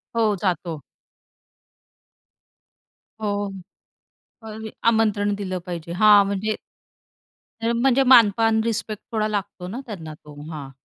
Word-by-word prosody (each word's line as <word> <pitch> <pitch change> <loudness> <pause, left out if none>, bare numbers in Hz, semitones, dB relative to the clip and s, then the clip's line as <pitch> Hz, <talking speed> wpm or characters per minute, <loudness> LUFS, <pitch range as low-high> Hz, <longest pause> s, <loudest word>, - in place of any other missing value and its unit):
हो, 220 -3 +2
जातो. 170 -5 -2 2.4
हो. 205 -1 -2 0.9
अरे 220 0 -8 0.2
आमंत्रण 215 -2 +2
दिलं 190 -2 -4
पाहिजे, 170 -2 -6
हां. 205 +1 +6
म्हणजे 200 +2 -1 1.1
हे 230 - +2
म्हणजे 255 +3 +3
मानपान, 225 -3 +5
रिस्पेक्ट 215 -1 -3
थोडा 215 -2 0
लागतो 200 -3 -4
ना 230 +7 -5
त्यांना 165 -9 -7
तो. 150 0 -15 0.2
हां. 140 -3 -7
210 Hz, 105 wpm, -23 LUFS, 185-220 Hz, 2.4 s, हां